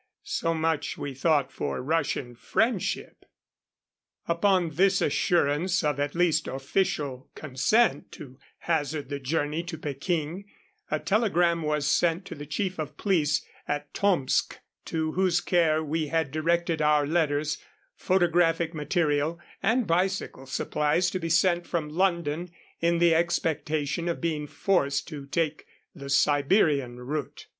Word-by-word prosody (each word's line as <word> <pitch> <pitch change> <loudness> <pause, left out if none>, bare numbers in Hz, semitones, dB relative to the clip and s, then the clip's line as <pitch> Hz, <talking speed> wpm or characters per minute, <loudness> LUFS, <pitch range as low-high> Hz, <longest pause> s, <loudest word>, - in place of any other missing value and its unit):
So 165 0 -1
much, 160 -2 -1
we 140 - -5
thought, 140 -1 +1
for 70 - -3
Russian 135 -4 -1
friendship. 220 - -1 1.0
Upon 175 0 +2
this 190 +4 +3
assurance 170 +4 +1
of 150 -2 0
at 145 +1 -1
least 170 -3 +2
official 135 -1 -2
consent 155 - +1
to 135 -6 -11 0.2
hazard 150 -4 -1
the 140 -1 -3
journey 145 +3 -1
to 170 -1 -6
Peking, 155 +5 -3 0.4
a - - +1
telegram 175 -6 +2
was 150 -2 -1
sent 170 +5 +2
to - - -7
the 145 0 -9
chief 185 +3 -2
of 150 -1 -5
police 160 -7 +1 0.2
at 145 0 -3
Tomsk, 180 -10 +1 0.3
to 160 -1 -2
whose 180 0 +2
care 160 -4 +2
we 155 +1 -1
had 160 -2 0
directed 165 +1 0
our 150 -1 +3
letters, 150 -1 0 0.4
photographic 170 -2 +2
material, 150 0 0 0.2
and 235 +3 +2
bicycle 180 -6 -1
supplies 150 +6 0
to 185 - -2
be 165 -1 -3
sent 175 +1 +2
from 160 -4 -2
London 170 -1 0 0.3
in 170 0 +2
the 170 -1 +4
expectation 160 -1 0
of 170 - -2
being 155 -3 -2
forced 140 -6 0
to 145 -4 -8
take 155 0 -2 0.3
the 140 -4 -9
Siberian 140 - +2
route. 140 +3 -5
160 Hz, 135 wpm, -27 LUFS, 145-175 Hz, 1.0 s, the